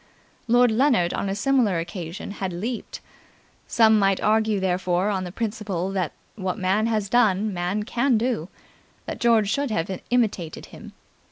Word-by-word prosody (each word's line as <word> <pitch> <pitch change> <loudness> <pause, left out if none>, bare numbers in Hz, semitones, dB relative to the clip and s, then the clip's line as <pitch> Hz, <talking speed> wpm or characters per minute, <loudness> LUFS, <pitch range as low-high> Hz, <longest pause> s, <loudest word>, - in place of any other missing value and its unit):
Lord 245 0 +4
Leonard 230 -7 +2
on 200 - -2
a 195 - -2
similar 225 -4 +2
occasion 170 +2 -6
had 195 -2 -4
leaped. 225 +7 -5 0.7
Some 220 -2 +4
might 195 -1 +2
argue 215 -1 +2
therefore 185 +1 0
on 190 -2 -2
the 180 - -6
principle 205 -4 -3
that 185 -6 -1 0.2
what 190 -2 -3
man 195 +3 +1
has 215 -3 0
done, 215 -2 +2
man 180 +4 -2
can 240 +2 +1
do, 225 -7 -1 0.6
that - - -6
George 225 -4 +3
should 280 +2 0
have 190 -2 -2
imitated 210 -9 -1
him. - - -12
205 Hz, 155 wpm, -24 LUFS, 185-225 Hz, 0.7 s, Lord